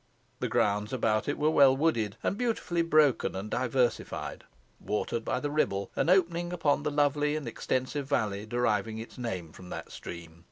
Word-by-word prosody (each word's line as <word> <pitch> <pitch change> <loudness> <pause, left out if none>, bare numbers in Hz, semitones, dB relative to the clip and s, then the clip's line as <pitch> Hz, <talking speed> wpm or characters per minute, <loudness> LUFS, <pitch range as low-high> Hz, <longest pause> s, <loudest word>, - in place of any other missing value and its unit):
The - - -1
grounds 105 +1 +1
about 110 -4 +1
it 145 - -1
were 150 +1 +2
well 135 -3 +6
wooded 115 -10 +1
and - - 0
beautifully 220 -7 0
broken 155 - +3
and 100 +3 -5
diversified, 125 0 -1 0.3
watered 105 +2 -2
by 125 - -1
the 145 +2 -3
Ribble, 100 -10 0
and - - +1
opening 175 -2 +2
upon 155 -5 +1
the 150 - -1
lovely 145 0 +2
and 150 -5 -4
extensive 130 +4 -2
valley 105 -6 0
deriving 110 -2 0
its 115 +3 -9
name 95 -9 -4
from 90 +2 -12
that - - -7
stream. 85 -1 -9
130 Hz, 170 wpm, -29 LUFS, 105-150 Hz, 0.3 s, well